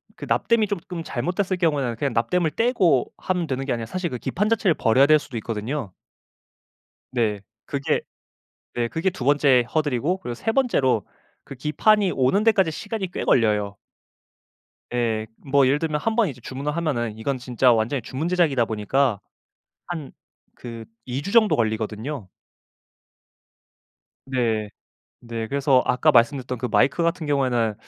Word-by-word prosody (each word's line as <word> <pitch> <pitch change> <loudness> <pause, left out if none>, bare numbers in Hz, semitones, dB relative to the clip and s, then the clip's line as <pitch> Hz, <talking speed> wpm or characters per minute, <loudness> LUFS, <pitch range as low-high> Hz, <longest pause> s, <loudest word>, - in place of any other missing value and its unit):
그 - - -8
납땜이 230 -2 +2
쪼금 180 -3 -5
잘못됐을 185 +3 -2
경우에는 145 -9 0
그냥 140 0 -1
납땜을 155 +9 +1
떼고 195 - +2
하면 180 -3 -2
되는 135 -1 -3
게 135 - 0
아니라 115 -1 -3
사실 185 -2 -3
그 125 - -4
기판 200 - -1
자체를 205 -7 +2
버려야 130 +2 +4
될 155 0 +6
수도 135 -3 -11
있거든요. 110 0 -4 1.2
네. 110 -5 0 0.2
그게 140 - -1 0.8
네 120 -1 0
그게 160 +9 -1
2 170 -9 -7
번째 140 -3 +4
허들이고 150 +3 0
그리고 120 -9 -5
3 225 - -1
번째로 140 - +1 0.4
그 140 - -10
기판이 190 - +2
오는 135 +11 +2
데까지 195 -7 +3
시간이 205 +2 -5
꽤 - - -4
걸려요. 105 -3 +2 1.2
예. 115 -3 0
뭐 140 -1 +2
예를 135 +3 +3
들면 155 -1 -1
1 225 +7 -1
번 230 -5 +3
이제 125 -3 -9
주문을 140 +5 -4
하면은 120 -10 -2
이건 130 +4 -2
진짜 125 0 +2
완전히 115 +4 0
주문 130 +7 -3
제작이다 165 -9 +2
보니까 110 +1 0 0.7
한 160 -6 -6 0.4
그 115 -2 -8 0.2
2 125 +2 -3
주 200 - -5
정도 225 -3 +5
걸리거든요. 110 +2 -2 2.0
네. 115 -5 0 0.5
네 115 -2 -5
그래서 135 -2 +3
아까 155 +5 +3
말씀드렸던 125 0 +2
그 125 - -2
마이크 140 +7 +2
같은 165 -1 -1
경우에는 125 -6 +1
135 Hz, 310 characters per minute, -23 LUFS, 120-170 Hz, 2.0 s, 될